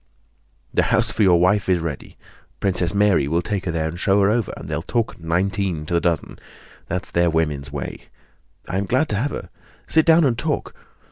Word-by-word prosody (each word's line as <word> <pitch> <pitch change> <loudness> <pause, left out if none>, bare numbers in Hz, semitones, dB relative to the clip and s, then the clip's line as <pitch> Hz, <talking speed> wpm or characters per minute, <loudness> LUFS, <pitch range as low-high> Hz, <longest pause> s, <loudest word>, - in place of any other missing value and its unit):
"The - - +3
house 115 -2 +2
for - - -2
your 90 -4 +5
wife 95 +3 +2
is 90 - +4
ready. 80 -5 -6 0.4
Princess 90 -3 +1
Mary 100 -8 +3
will 85 +4 0
take 100 0 -3
her 85 - -1
there 80 -1 -1
and 85 +2 -6
show 95 +2 +3
her 100 +1 +4
over, 115 -2 0
and - - -9
they'll 75 +1 -2
talk 115 +4 -2
nineteen 90 0 -1
to 85 - -4
the 85 - +2
dozen. 85 -3 -1 0.5
That's 90 - -3
their 85 0 +2
woman's 75 -4 -1
way! 70 -2 -6 0.6
I 95 - -1
am 100 - -3
glad 130 +8 +1
to 105 - 0
have 135 +7 0
her. - - -7 0.4
Sit 160 0 +2
down 165 +1 +6
and 130 -5 +2
talk. 150 +5 -2
95 Hz, 205 wpm, -22 LUFS, 80-105 Hz, 0.6 s, down